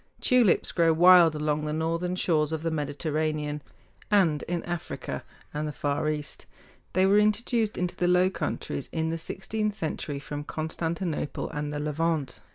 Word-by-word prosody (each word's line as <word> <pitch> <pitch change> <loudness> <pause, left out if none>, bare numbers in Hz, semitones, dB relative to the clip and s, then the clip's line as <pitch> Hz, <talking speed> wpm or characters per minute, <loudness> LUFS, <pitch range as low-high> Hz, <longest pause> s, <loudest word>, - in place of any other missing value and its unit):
Tulips 245 -7 +3
grow 165 -2 +3
wild 175 -1 +7
along 150 0 -1
the 150 - -2
northern 165 +3 -1
shores 155 -4 +1
of 160 0 -3
the 165 - 0
Mediterranean, 150 0 -2 0.5
and 175 -8 +3
in 175 0 -2
Africa 175 -2 -5 0.3
and 150 +1 -2
the - - -3
Far 145 +1 -1
East. 150 -1 -4 0.5
They 185 +1 +4
were 200 +2 +5
introduced 215 +1 +1
into 180 -1 -1
the 180 - +1
Low 180 +1 +4
Countries 140 - -4
in 160 0 -1
the 165 - -2
sixteenth 210 +5 -2
century 155 -6 -3
from 145 +1 -5
Constantinople 160 +1 -3
and 150 0 -3
the 145 - -3
Levant. 150 -3 -1
160 Hz, 160 wpm, -27 LUFS, 150-180 Hz, 0.5 s, wild